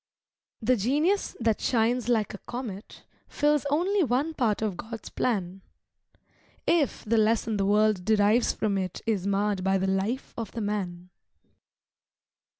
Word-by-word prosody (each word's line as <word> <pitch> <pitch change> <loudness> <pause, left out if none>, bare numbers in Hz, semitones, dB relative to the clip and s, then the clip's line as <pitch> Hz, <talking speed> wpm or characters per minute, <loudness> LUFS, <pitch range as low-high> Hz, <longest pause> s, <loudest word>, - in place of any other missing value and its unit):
The 250 +3 +3
genius 300 - +1
that 225 -3 +1
shines 240 0 +1
like 220 -3 +1
a 205 - -8
comet 235 -5 -7 0.2
Fills 295 -1 +1
only 365 +7 +2
one 280 +4 0
part 225 -7 0
of 210 -4 -1
God's 225 +4 -8
plan, 195 -5 -2 1.0
If 315 -6 +1
the 225 +1 +2
lesson 220 0 +1
the 195 -1 +1
world 210 -2 +3
derives 215 +3 +3
from 200 -3 -1
it 185 -1 -5
Is 200 -4 0
marred 200 -1 0
by 190 0 +2
the 190 - -1
life 195 +7 -1
of 225 -4 -6
the 230 - -4
man. 185 -4 -4
220 Hz, 145 wpm, -27 LUFS, 195-245 Hz, 1.0 s, The